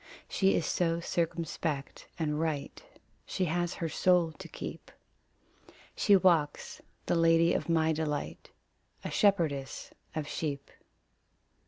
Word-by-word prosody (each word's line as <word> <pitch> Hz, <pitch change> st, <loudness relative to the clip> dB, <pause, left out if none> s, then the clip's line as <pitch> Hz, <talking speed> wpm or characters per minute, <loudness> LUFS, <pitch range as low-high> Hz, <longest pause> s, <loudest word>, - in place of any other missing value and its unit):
She 195 Hz, -1 st, +2 dB
is 165 Hz, -, 0 dB
so 165 Hz, 0 st, +1 dB
circumspect 165 Hz, -4 st, -3 dB
and 150 Hz, -2 st, -1 dB
right; 160 Hz, -, -3 dB, 0.4 s
She 185 Hz, -, -1 dB
has 175 Hz, +1 st, -1 dB
her 165 Hz, -, -2 dB
soul 175 Hz, +1 st, +3 dB
to -, -, -8 dB
keep. -, -, -8 dB, 1.1 s
She 205 Hz, -, +5 dB
walks 170 Hz, -6 st, +2 dB, 0.2 s
the -, -, +1 dB
lady 165 Hz, 0 st, +4 dB
of -, -, -2 dB
my 160 Hz, -1 st, +3 dB
delight 150 Hz, -2 st, -3 dB, 0.6 s
A -, -, -3 dB
shepherdess 165 Hz, -, +1 dB, 0.2 s
of 155 Hz, -2 st, -3 dB
sheep. 140 Hz, -3 st, -4 dB
165 Hz, 120 wpm, -30 LUFS, 150-175 Hz, 1.1 s, She